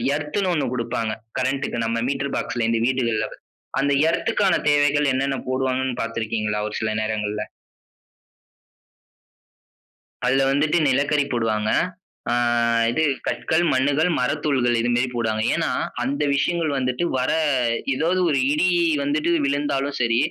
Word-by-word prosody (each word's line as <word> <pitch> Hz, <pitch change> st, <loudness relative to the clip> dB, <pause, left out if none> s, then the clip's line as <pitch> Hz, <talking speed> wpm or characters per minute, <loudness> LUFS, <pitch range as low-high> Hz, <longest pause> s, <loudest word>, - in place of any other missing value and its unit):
எர்த்ன்னு 170 Hz, +6 st, -1 dB
ஒண்ணு 150 Hz, -, 0 dB
குடுப்பாங்க. 115 Hz, -2 st, -2 dB, 0.3 s
கரண்ட்‌டுக்கு 130 Hz, -2 st, -1 dB
நம்ம 115 Hz, +1 st, -1 dB
மீட்டர் 140 Hz, 0 st, -2 dB
பாக்ஸ்ல 120 Hz, -3 st, -2 dB
இந்த 115 Hz, -1 st, +1 dB
வீடுகள்ல. 115 Hz, -4 st, 0 dB, 0.5 s
அந்த 140 Hz, +1 st, +1 dB, 0.2 s
எர்த்‌க்கான 190 Hz, +2 st, +1 dB
தேவைகள் 145 Hz, -1 st, +3 dB
என்னென்ன 135 Hz, 0 st, 0 dB
போடுவாங்கன்னு 130 Hz, -1 st, -1 dB
பார்த்திருக்கீங்களா, 110 Hz, -2 st, -2 dB
ஒரு 105 Hz, -, -6 dB
சில 110 Hz, -, -1 dB
நேரங்கள்ல? 105 Hz, -1 st, -2 dB, 2.8 s
அதுல 135 Hz, +2 st, +3 dB
வந்துட்டு 150 Hz, +4 st, +2 dB
நிலக்கரி 140 Hz, +2 st, +2 dB
போடுவாங்க. 110 Hz, -2 st, 0 dB, 0.6 s
அ -, -, +2 dB, 0.6 s
இது 155 Hz, -, 0 dB, 0.2 s
கற்கள், 160 Hz, +2 st, 0 dB
மண்ணுகள், 145 Hz, +5 st, +2 dB
மரத்தூள்கள் 130 Hz, -2 st, +1 dB
இது 120 Hz, +1 st, 0 dB
மாதிரி 125 Hz, +1 st, +1 dB
போடுவாங்க. 110 Hz, -2 st, -1 dB
ஏன்னா, -, -, 0 dB, 0.3 s
அந்த 140 Hz, +3 st, -2 dB
விஷயங்கள் 165 Hz, +2 st, 0 dB
வந்துட்டு 125 Hz, +3 st, -1 dB
வர 125 Hz, -, 0 dB, 0.6 s
ஏதாவது 165 Hz, +7 st, 0 dB
ஒரு 140 Hz, -3 st, +2 dB
இடி 150 Hz, +5 st, +2 dB, 0.3 s
வந்துட்டு 150 Hz, +4 st, 0 dB
விழுந்தாலும் 140 Hz, 0 st, -1 dB
சரி, 115 Hz, -2 st, +2 dB
130 Hz, 120 wpm, -22 LUFS, 115-145 Hz, 2.8 s, தேவைகள்